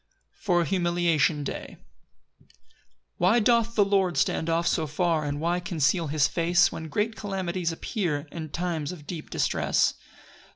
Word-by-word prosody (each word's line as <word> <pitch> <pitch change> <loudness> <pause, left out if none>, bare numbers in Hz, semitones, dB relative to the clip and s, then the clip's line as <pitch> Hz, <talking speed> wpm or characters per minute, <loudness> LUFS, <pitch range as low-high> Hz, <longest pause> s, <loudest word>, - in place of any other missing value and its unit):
For 175 -4 +2
a - - 0
humiliation 170 -3 +1
day. - - -6 0.6
1 - - -28 0.7
Why 190 +7 +4
doth 230 0 +2
the 205 - +4
Lord 190 -5 +1
stand 160 +4 +1
off 165 +1 +1
so 160 -2 +1
far, 160 +1 0
And 145 0 -3
why 170 +3 0
conceal 165 -1 0
his 145 0 +2
face, 175 +2 +3
When 160 - -6
great 210 +8 -1
calamities 185 -4 -2
appear, 165 - -2
And 160 -3 -7
times 170 -3 -2
of 165 -5 -10
deep 160 -1 -7
distress? - - +1
170 Hz, 155 wpm, -26 LUFS, 155-185 Hz, 0.7 s, Why